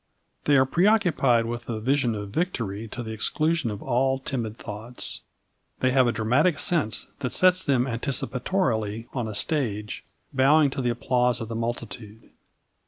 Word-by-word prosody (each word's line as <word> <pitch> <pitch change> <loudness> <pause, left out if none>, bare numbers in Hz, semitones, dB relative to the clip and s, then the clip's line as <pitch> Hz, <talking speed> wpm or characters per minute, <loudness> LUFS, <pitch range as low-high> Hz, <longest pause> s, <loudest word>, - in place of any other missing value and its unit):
They 145 -1 +5
are 130 - +5
preoccupied 170 - +3
with 120 +1 -4
the 115 -2 -3
vision 125 0 +1
of 100 -1 -6
victory 115 - -2
to 120 +3 -6
the 110 - -6
exclusion 155 +5 0
of 105 -2 -6
all 130 +2 +1
timid 120 -5 -4
thoughts. 110 +3 -6 0.6
They 130 - +2
have 130 -1 +4
a - - +3
dramatic 125 - +2
sense 150 -11 0
that 130 -3 -2
sets 185 0 +4
them 130 -3 +2
anticipatorily 120 - -1
on 120 -4 -2
a 110 - -5
stage, 105 -7 -2 0.3
bowing 140 +2 +4
to 135 - -3
the 125 - +1
applause 125 0 +1
of 115 -2 -5
the 115 - -4
multitude. 115 -1 -5
125 Hz, 160 wpm, -25 LUFS, 115-140 Hz, 0.6 s, They